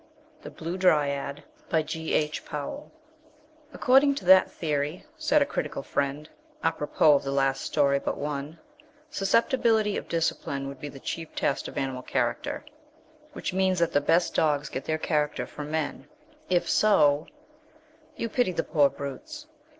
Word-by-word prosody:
THE - - -8
BLUE 170 +3 -5
DRYAD 145 -5 +1 2.3
"According 275 +1 +4
to 200 - -6
that 190 +1 +7
theory" 150 +1 -2
said 300 -2 +3
a - - -3
critical 280 - -4
friend, 140 +2 -2 0.4
à - - +2
propos 150 0 +4
of - - -6
the 135 - -4
last 135 -1 +1
story 140 -2 +2
but - - -3
one 145 +2 -4 0.5
"susceptibility 220 0 +2
of - - -6
'discipline' 140 -4 -2
would 140 -1 -8
be 145 - -6
the 135 - -11
chief 165 +3 -6
test 135 - -1
of - - -9
animal 130 -1 -2
character, - - -2 0.7
which - - -4
means 190 0 +2
that 170 -1 +2
the 145 - +3
best 165 +4 +2
dogs 150 -2 +1
get 130 - -5
their 155 - 0
character 150 -2 -1
from 150 0 -8
men. 155 -1 -3 0.4
If 180 -1 +2
so 150 -9 +4 0.4
" 310 0 -30
"You 230 - -2
pity 230 -4 0
the 165 - -1
poor 145 -3 +3
brutes?" 220 - -7
155 Hz, 150 wpm, -27 LUFS, 140-190 Hz, 2.3 s, that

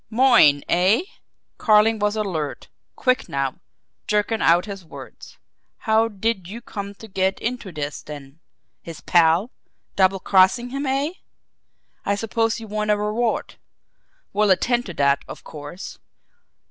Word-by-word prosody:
"Moyne, 225 - +5
eh?" 190 - +3 0.6
Carling 215 0 +4
was 210 +1 0
alert, 175 -9 -3 0.3
quick 255 0 0
now, 135 -1 -2 0.5
jerking 210 +1 0
out 170 +2 +4
his 200 -3 -7
words. 160 - -12 0.4
"How 220 0 +2
did 205 -3 -2
you 215 +5 -7
come 200 -4 -7
to 220 - -12
get 190 -1 0
into 235 -4 -4
this, 150 -2 -5
then? 145 0 -11 0.4
His 165 -1 -10
pal? 170 +7 +3 0.4
Double 190 0 +3
crossing 190 +7 +3
him, 275 +1 -3
eh? 275 +4 0 0.9
I 200 - 0
suppose 225 +2 -1
you 225 - -8
want 210 0 -2
a 210 - +3
reward 215 +3 -1 0.8
we'll 210 0 +2
attend 240 +5 +2
to 175 - -7
that, 140 0 +2
of - - -10
course. 150 +5 -9
205 Hz, 135 wpm, -22 LUFS, 175-225 Hz, 0.9 s, Moyne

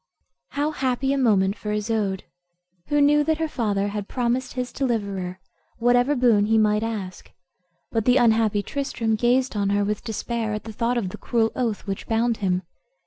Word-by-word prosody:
How 290 +2 0
happy 265 -1 0
a - - 0
moment 200 -5 +3
for 210 - -5
Isoude, 210 -2 -1 0.6
who 290 0 +2
knew 295 +1 +5
that 315 +1 +1
her 320 0 -1
father 205 -8 -1
had 205 -1 -4
promised 250 +1 -1
his 250 -1 -4
deliverer 200 -8 -2 0.4
whatever 245 +4 +3
boon 230 -5 +3
he 225 0 +3
might 210 -1 +3
ask! 210 -5 -5 0.6
But 225 -2 0
the 250 +1 +5
unhappy 220 -4 +3
Tristram 240 -5 -2
gazed 245 +3 +2
on 200 -1 0
her 205 0 +1
with 210 0 -2
despair, 225 -1 -3
at 210 - -5
the 220 - -8
thought 235 +3 0
of 205 -6 -1
the - - -8
cruel 225 -2 +1
oath 235 -5 -2
which 195 -2 -5
bound 230 +1 +1
him. 185 -2 0
225 Hz, 180 wpm, -24 LUFS, 205-250 Hz, 0.6 s, knew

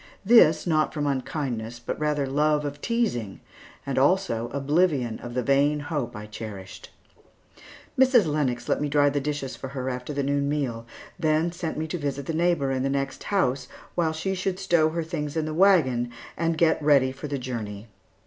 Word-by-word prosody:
This, 205 -8 +6
not 155 -2 +1
from 150 -1 -1
unkindness, 130 -4 -3
but 120 - -5
rather 150 -2 0
love 150 +2 +1
of 145 0 -5
teasing, 200 - -1 0.5
and 135 -1 0
also 135 -7 +2
oblivion 140 -4 +1
of 120 0 -8
the 125 - 0
vain 140 +3 +3
hope 145 -4 -3
I 105 0 -7
cherished. 105 -3 -9 1.1
Mrs. 255 -5 +6
Lennox 135 -6 -1
let - - +1
me 150 - 0
dry 145 0 +3
the 145 - 0
dishes 145 -2 -3
for 135 - -7
her 130 -1 -3
after 125 +3 -5
the 140 -1 -1
noon 140 0 0
meal, 125 -6 -2 0.3
then 160 +1 +2
sent 170 -3 -4
me 155 - -1
to 165 +2 -4
visit 140 -2 -3
the 165 - -3
neighbor 165 -4 +1
in 130 -1 -1
the 135 - 0
next 135 -1 -3
house, 135 -10 0 0.3
while 165 -2 +1
she 160 +5 -2
should 190 0 -2
stow 170 -5 +3
her 165 +1 -2
things 150 -1 -4
in 155 - 0
the 155 - -3
wagon 155 -10 +4 0.3
and 165 -1 0
get 160 -1 +3
ready 140 -3 +4
for 135 +3 -7
the 140 -1 -2
journey. 115 -5 -5
145 Hz, 185 wpm, -25 LUFS, 130-160 Hz, 1.1 s, This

